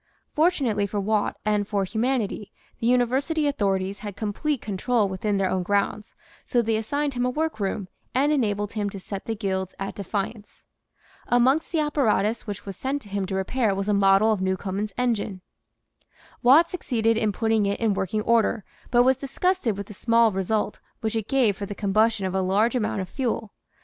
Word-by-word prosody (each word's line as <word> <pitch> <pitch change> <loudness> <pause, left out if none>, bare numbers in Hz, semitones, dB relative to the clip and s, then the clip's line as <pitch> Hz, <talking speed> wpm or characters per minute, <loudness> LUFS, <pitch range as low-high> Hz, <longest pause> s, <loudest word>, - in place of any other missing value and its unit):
Fortunately 275 - +2
for 205 +1 -3
Watt 210 +1 0
and 210 -1 +1
for 200 -2 0
humanity 220 -1 -1 0.3
the 230 - 0
University 260 +6 +2
authorities 195 -7 0
had 205 -1 -7
complete 235 +8 -2
control 215 +2 0
within 195 +2 -1
their 195 -1 +1
own 185 - 0
grounds, 205 +3 -1 0.3
so 245 - 0
they 225 0 +1
assigned 285 +6 -1
him 245 0 -1
a 250 - +2
workroom 220 -10 -2 0.3
and 280 +3 +3
enabled 205 -7 0
him 210 -2 -1
to 195 - -8
set 195 +1 -6
the 225 - -2
guilds 190 -3 -3
at 195 0 -4
defiance. 205 +2 -5 0.6
Amongst 260 +6 +3
the 325 -3 +1
apparatus 230 -7 +1
which 205 -2 -6
was 195 -1 -6
sent 270 +7 -3
to 205 - -14
him 195 -1 -2
to 190 - -3
repair 205 +2 0
was 195 +1 -3
a 210 - +2
model 200 +2 +4
of 210 -3 0
Newcomen's 190 +2 -2
engine. 220 -6 -1 1.0
Watt 290 +7 +6
succeeded 230 -10 0
in 220 -1 +1
putting 220 -1 +1
it 200 - -1
in 225 -3 +2
working 195 +2 -1
order, 230 -2 +2 0.3
but 245 0 +5
was 260 0 +3
disgusted 275 - 0
with 200 - -4
the 210 - -10
small 230 +2 +3
result 205 +2 -1 0.2
which 220 0 -2
it 220 -2 -2
gave 250 -7 +3
for 200 +1 -5
the 205 - -6
combustion 215 +1 +2
of 185 - -2
a 190 - +1
large 205 +6 +2
amount 215 -4 0
of 185 - -5
fuel. 225 -3 -3
215 Hz, 185 wpm, -25 LUFS, 200-245 Hz, 1.0 s, Watt